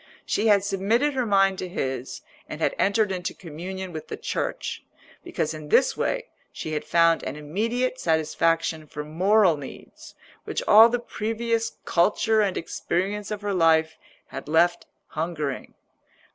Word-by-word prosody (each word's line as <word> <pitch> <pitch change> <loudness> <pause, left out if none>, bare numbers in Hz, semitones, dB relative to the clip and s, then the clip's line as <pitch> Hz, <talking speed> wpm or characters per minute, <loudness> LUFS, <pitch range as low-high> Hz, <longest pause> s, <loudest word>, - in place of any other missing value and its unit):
She 220 - 0
had 205 -2 +5
submitted 215 +9 +1
her 255 -3 -1
mind 195 -2 +3
to 185 - -4
his 130 -6 -4 0.3
and - - -6
had - - +1
entered 205 +1 +2
into 185 -1 -3
communion 185 +3 -7
with 155 - -7
the - - -6
Church, - - -3 0.4
because 155 0 -2
in 155 -1 -9
this 260 - +4
way - - -1 0.3
she 155 - -6
had 150 - -2
found 165 -1 +3
an 135 - -5
immediate 230 +12 -2
satisfaction 160 0 0
for 150 +1 -6
moral 180 +3 +3
needs 140 -2 -11 0.3
which - - -3
all 220 +2 +9
the 245 - 0
previous 230 0 -2
culture 215 +5 +2
and 195 -3 0
experience 195 +4 -2
of 210 -1 -4
her 205 -1 -2
life 160 -2 +3 0.3
had - - -8
left 170 +3 +2 0.2
hungering. 155 -4 -4
185 Hz, 150 wpm, -25 LUFS, 160-215 Hz, 0.4 s, all